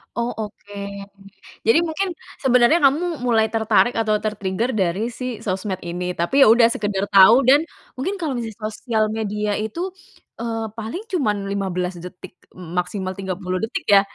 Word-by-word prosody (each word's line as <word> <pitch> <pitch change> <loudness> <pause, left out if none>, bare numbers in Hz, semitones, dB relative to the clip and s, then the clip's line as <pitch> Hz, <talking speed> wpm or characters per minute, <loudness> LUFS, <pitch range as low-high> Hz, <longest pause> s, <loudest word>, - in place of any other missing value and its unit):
Oh, 235 +1 -1
oke. 205 -1 -8 0.9
Jadi 225 +8 +6
mungkin 340 +4 -2 0.3
sebenarnya 250 +4 +5
kamu 315 +4 +2
mulai 230 -3 +3
tertarik 225 +2 +3
atau 215 -2 +2
ter-trigger 215 +2 -1
dari 190 +2 0
si 250 -2 -5
sosmed 190 -1 -2
ini. 180 +1 -3
Tapi 175 +12 +2
ya - - +6
udah 230 +1 +7
sekedar 200 -3 -1
tau 200 +5 +8
dan 275 +4 +6 0.4
mungkin 375 +10 -1
kalau 315 -5 -2 0.3
sosial 220 0 -1
media 210 -1 -2
itu, 335 - -3 0.5
eee, 225 -1 -2
paling 225 - -5
cuman 210 - 0
15 185 -2 -2
detik 180 0 -10 0.2
m 175 -2 -10
maksimal 185 +1 -3
30 185 -1 -3
detik 225 - -3
ya. 200 -1 +7
215 Hz, 150 wpm, -21 LUFS, 195-245 Hz, 0.9 s, tau